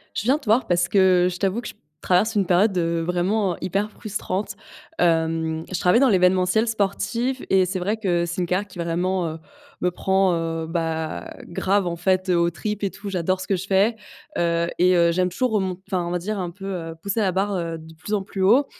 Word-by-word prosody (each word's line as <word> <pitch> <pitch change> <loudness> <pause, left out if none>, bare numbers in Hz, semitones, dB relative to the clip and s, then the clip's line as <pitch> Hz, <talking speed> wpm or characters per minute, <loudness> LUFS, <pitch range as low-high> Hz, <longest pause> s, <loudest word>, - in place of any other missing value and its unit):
Je - - -1
viens 260 +6 +3
te 305 - -15
voir 225 +2 +3
parce 175 0 +2
que 185 -3 +4
je 180 - -6
t'avoue 195 +4 0
que - - -7
je - - -9 0.3
traverse 210 +5 +2
une 200 -2 +2
période, 185 +3 +3
heu, 170 -1 0
vraiment, 180 +3 0
heu, - - -16
hyper 200 +3 -1
frustrante. 210 -2 -4 0.4
Hem, 160 -1 +1
je 185 - -1
travaille 180 +6 +4
dans 270 -1 +5
l'événementiel 185 +3 +3
sportif 225 +4 -1
et 190 -1 +4
c'est 185 +1 -3
vrai 205 +5 -1
que 175 -5 0
c'est 170 +2 -3
une 175 - -1
carrière 185 +4 0
qui, 185 - -14
vraiment, 175 +2 -1
heu, 160 +1 -7 0.4
me 180 - +2
prend, 190 +1 +2
heu, 165 -1 -3
bah, 160 -1 -3
grave, 190 +2 0
en 170 - -2
fait, 185 +2 0
heu, 180 - +3
aux 170 0 +3
tripes 210 +4 -4
et 200 - +1
tout. 205 0 -8
J'adore 185 0 -1
ce - - -7
que 195 - +2
je 185 - -5
fais, 200 +4 +3 0.4
heu, 170 0 +1
et, 180 +1 +5
heu, 170 0 +4
j'aime 180 +1 +2
toujours 250 +6 -1
au 210 - +2
m 185 -1 -2
enfin, 185 -3 -1
on 170 - -3
va 180 - -1
dire 205 +4 -3
un 175 -2 -3
peu, 195 +2 -11
heu, 165 -2 -5
pousser 200 +4 -2
la 195 -3 +2
barre, 195 +2 0
heu, 165 -2 -3
de 160 0 -13
plus 180 +6 -6
en 205 - +1
plus 190 0 -6
haut, 240 +9 +5
185 Hz, 235 wpm, -23 LUFS, 170-200 Hz, 0.4 s, dans